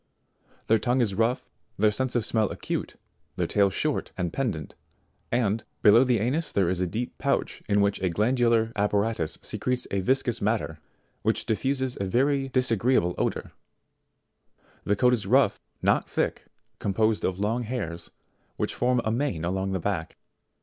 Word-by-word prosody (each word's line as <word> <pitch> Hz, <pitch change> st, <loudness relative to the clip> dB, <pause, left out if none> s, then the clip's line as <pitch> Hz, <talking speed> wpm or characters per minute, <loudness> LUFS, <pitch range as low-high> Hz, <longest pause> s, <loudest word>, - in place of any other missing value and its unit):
Their 110 Hz, 0 st, +3 dB
tongue 125 Hz, +3 st, +1 dB
is 110 Hz, -5 st, +2 dB
rough, 115 Hz, +5 st, 0 dB, 0.3 s
their 105 Hz, +1 st, +4 dB
sense 130 Hz, +4 st, -1 dB
of 120 Hz, -3 st, +2 dB
smell 110 Hz, -2 st, +1 dB
acute, -, -, -4 dB, 0.4 s
their -, -, 0 dB
tail 100 Hz, -1 st, +3 dB
short 150 Hz, +10 st, -2 dB
and 90 Hz, -3 st, -2 dB
pendant, 100 Hz, -, -2 dB, 0.6 s
and, 115 Hz, -2 st, +1 dB, 0.2 s
below 110 Hz, +4 st, +7 dB
the 125 Hz, -2 st, +2 dB
anus 135 Hz, +10 st, -1 dB
there 95 Hz, -3 st, +2 dB
is 90 Hz, -1 st, -2 dB
a 90 Hz, -, +1 dB
deep 115 Hz, +8 st, -4 dB
pouch -, -, -1 dB
in 100 Hz, 0 st, +4 dB
which 100 Hz, -1 st, +1 dB
a 95 Hz, -, +1 dB
glandular 115 Hz, +3 st, +2 dB
apparatus 105 Hz, -4 st, 0 dB
secretes 125 Hz, -1 st, -1 dB
a 100 Hz, -, 0 dB
viscous 125 Hz, +3 st, 0 dB
matter, 100 Hz, -7 st, -1 dB, 0.4 s
which -, -, 0 dB
diffuses 130 Hz, +3 st, -1 dB
a -, -, 0 dB
very 135 Hz, +7 st, +1 dB
disa 125 Hz, -3 st, +1 dB
greeable 100 Hz, -6 st, +2 dB
odour -, -, -2 dB, 1.3 s
The 105 Hz, -, +2 dB
coat 125 Hz, +4 st, +4 dB
is 105 Hz, -6 st, -1 dB
rough, -, -, +3 dB, 0.2 s
not -, -, +2 dB
thick, -, -, -1 dB, 0.3 s
composed 110 Hz, +2 st, +1 dB
of 95 Hz, 0 st, -1 dB
long 110 Hz, +4 st, 0 dB
hairs, 85 Hz, -9 st, -4 dB, 0.5 s
which -, -, -1 dB
form 125 Hz, 0 st, +1 dB
a 110 Hz, -, +1 dB
mane 115 Hz, -, -1 dB
along 95 Hz, +2 st, -1 dB
the 95 Hz, -, -1 dB
back. 85 Hz, -2 st, -3 dB
110 Hz, 165 wpm, -26 LUFS, 95-125 Hz, 1.3 s, below